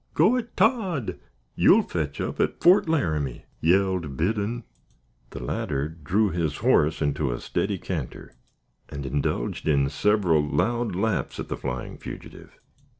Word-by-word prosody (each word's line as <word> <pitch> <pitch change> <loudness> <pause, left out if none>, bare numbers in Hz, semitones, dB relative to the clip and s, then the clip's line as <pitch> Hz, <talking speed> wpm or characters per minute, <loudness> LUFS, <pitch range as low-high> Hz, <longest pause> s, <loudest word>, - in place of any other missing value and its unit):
"Go 185 +11 +5
it, 240 -2 -4
Todd! 190 - +1 0.3
you'll - - +5
fetch 75 -5 -3
up - - -3
at - - 0
Fort 180 -1 +5
Laramie," 80 - -1
yelled 90 -5 +1
Biddon. 105 - -1 0.7
The 70 - -7
latter 70 +4 -2
drew 85 +7 0
his 80 -4 -1
horse 80 +2 +2
into 70 -2 0
a - - -3
steady 100 -1 -1
canter, 80 -8 -6 0.6
and 70 -1 -6
indulged 70 -2 -2
in 70 -3 +3
several 95 -1 +2
loud 115 +8 0
laughs 105 +2 -1
at - - -5
the - - -2
flying 60 0 -5
fugitive. - - -10
85 Hz, 140 wpm, -25 LUFS, 75-110 Hz, 0.7 s, Go